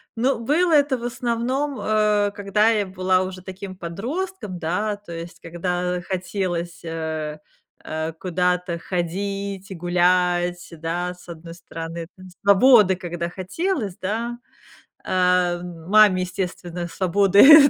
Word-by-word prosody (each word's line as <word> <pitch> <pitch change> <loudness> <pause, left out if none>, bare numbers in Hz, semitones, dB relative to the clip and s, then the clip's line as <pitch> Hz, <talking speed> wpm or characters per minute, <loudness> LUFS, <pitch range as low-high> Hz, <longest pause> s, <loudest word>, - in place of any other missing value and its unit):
Но 245 +1 +1
было 325 +9 +2
это 285 -3 +4
в 235 - -10
основном, 245 +4 -1
э, 210 -1 +2
когда 205 +2 +2
я 215 -3 +2
была 185 0 +1
уже 185 0 -6
таким 190 +1 -8
подростком, 205 - -4
да, 190 +6 -1
то 205 -4 -13
есть 170 0 -8
когда 180 +1 -2
хотелось, 180 -2 -3
э, 160 -2 -4 0.4
э, 160 +1 -3
куда-то 180 +1 0
ходить 195 +3 -3
и 190 - -4
гулять, 175 0 +2
да, 175 +3 -2
с 180 - -18
1 165 0 -9
стороны, 165 -1 -7
там 185 0 -13 0.2
свободы 200 -1 +7
когда 175 -1 -4
хотелось, 205 - -2
да. 230 +5 -2 0.7
А 180 -1 +2
маме, 185 +3 +4
естественно, 180 -1 -4
свободы 200 - +7
185 Hz, 120 wpm, -23 LUFS, 175-210 Hz, 0.7 s, свободы